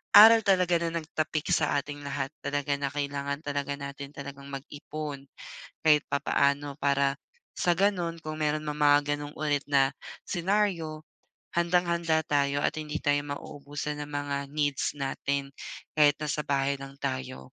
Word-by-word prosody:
aral 225 +2 +11
talaga 180 -3 +4
na 170 0 -1
nagtapik 155 0 -2
sa 155 -2 +2
ating 145 +1 -7
lahat 140 0 -2
talaga, 145 0 -1
na 140 - 0
kailangan 140 0 -2
talaga 145 -1 -2
natin 140 0 -7
talagang 140 0 -8
mag-ipon, 145 0 -6 0.5
kahit 150 -2 +5
papaano 140 0 +1
para 140 0 +2 0.4
sa 175 - +3
gano'n 175 -3 0
kung 155 0 -5
merong 150 +1 +1
mga 145 -1 +3
gano'ng 145 0 -7
ulit 145 -2 0
na 135 -1 +4 0.4
scenario, 175 -4 0 0.5
handang-handa 170 -2 +2
tayo 140 0 +1
at - - +1
hindi 155 0 -3
tayo 145 -1 +2
mauubusan 145 +1 -5
ng 145 - -6
mga 145 -1 -2
needs 145 -2 0
natin 140 0 -2 0.4
kahit 150 -1 +5
nasa 150 0 -2
bahay 140 0 +1
lang 135 0 -9
tayo. 130 -1 -3
145 Hz, 140 wpm, -28 LUFS, 140-155 Hz, 0.5 s, aral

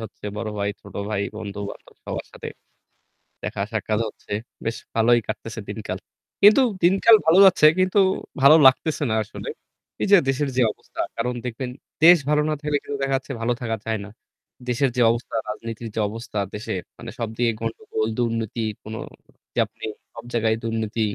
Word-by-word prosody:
হচ্ছে 110 - -10
বড় 110 0 -3
ভাই, 100 0 0
ছোট 100 - -14 0.2
ভাই, 100 -1 0
বন্ধু-বান্ধব 100 -1 -7
সবার - - -4
সাথে। - - -7 1.0
দেখা-সাক্ষাৎ 105 +1 -2
হচ্ছে। 105 - -13 0.3
বেশ 115 - -1 0.2
ভালোই 120 +1 +5
কাটতেছে - - -5
দিনকাল। - - -4 0.4
কিন্তু 210 +6 +8 0.2
দিনকাল 195 +5 +7
ভালো 165 +3 +5
যাচ্ছে 185 -5 +6
কিন্তু 185 +2 +3 0.4
ভালো 140 +3 +9
লাগতেছে 145 +3 +4
না - - +2
আসলে। 105 - -8 0.5
এই - - +1
যে 200 - +10
দেশের 135 +1 0
যে - - +4
অবস্থা - - -15 0.2
কারণ 125 +2 -1
দেখবেন 125 +1 -4 0.3
দেশ 175 +1 +10
ভালো 150 0 +4
না 155 - +1
থাকলে 150 -1 0
কিন্তু 145 -1 -4
দেখা 135 0 +1
যাচ্ছে 135 +1 -8
ভালো 120 +1 +1
থাকা 115 -2 -1
যায় 110 -1 -1
না। - - -10 0.6
দেশের 125 +2 +2
যে - - +3
অবস্থা, 115 0 -4
রাজনীতির 115 +1 -5
যে - - -1
অবস্থা 115 +1 -7 0.2
দেশে, 105 - -4 0.2
মানে - - -8
সবদিকে 115 +1 0
গন্ডগোল, 110 -1 -3
দুর্নীতি 115 -1 -1 0.2
কোন 110 - -8 0.6
যা - - +1
আপনি - - -19 0.3
সব 115 - -9
জায়গায় 110 -1 +2
দুর্নীতি, 115 -1 -2
115 Hz, 165 wpm, -23 LUFS, 110-140 Hz, 1.0 s, যে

